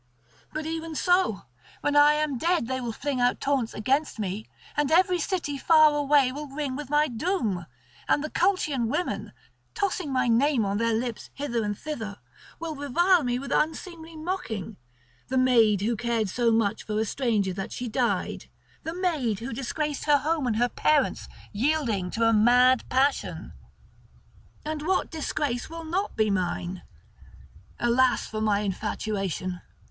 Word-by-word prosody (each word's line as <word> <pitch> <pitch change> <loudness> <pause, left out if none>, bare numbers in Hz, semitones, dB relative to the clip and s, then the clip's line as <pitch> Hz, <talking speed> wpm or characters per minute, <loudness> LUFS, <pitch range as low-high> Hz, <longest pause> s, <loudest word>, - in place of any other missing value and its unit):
But 310 0 -4
even 325 0 -4
so, 355 - +2 0.4
when 290 - 0
I 290 +1 +7
am 300 -4 -1
dead, 340 -3 +1
they 260 +2 -3
will 240 -2 -3
fling 265 +2 -2
out 245 0 +2
taunts 275 -5 0
against 270 +7 0
me; 210 +1 -4 0.3
and 295 -2 +1
every 360 +2 +4
city 320 -5 -2
far 310 0 +6
away 285 -2 +3
will 295 +3 -6
ring 275 -1 -4
with 290 -1 -6
my 295 +1 +3
doom, 230 - -2 0.4
and 290 - +3
the 305 - -4
Colchian 310 - +1
women, 355 +10 -2 0.4
tossing 370 -6 -1
my 255 -1 +1
name 240 0 +3
on 200 +1 -1
their 230 -1 +1
lips 235 0 -3
hither 240 -5 -2
and 205 -1 -2
thither, 225 -10 -5 0.4
will 330 -1 -4
revile 335 +5 +3
me 245 -1 0
with 275 +1 -6
unseemly 325 +1 -2
mocking—the 220 - -6
maid 230 -6 +4
who 230 +3 0
cared 230 -2 -1
so 235 +3 +1
much 225 -2 +1
for 215 -1 -2
a 220 - +1
stranger 215 -6 0
that 195 +1 -5
she 250 - -4
died, 220 - -1 0.3
the 325 +1 -5
maid 310 - 0
who 235 +4 -6
disgraced 290 +4 -3
her 295 -1 +5
home 300 -1 -1
and 225 - +1
her 240 +2 +3
parents, 305 +3 +1 0.2
yielding 230 -6 0
to 225 +5 -1
a 225 - +4
mad 245 +3 +5
passion. 270 +2 0 1.1
And 305 -1 -3
what 370 +5 0
disgrace 290 -5 -2
will 330 0 -7
not 375 +6 -2
be 215 -1 +2
mine? 180 -1 -2 1.0
Alas 245 +1 +3
for 215 0 -5
my 210 -2 +2
infatuation! 195 -2 -3
260 Hz, 160 wpm, -26 LUFS, 220-305 Hz, 1.1 s, I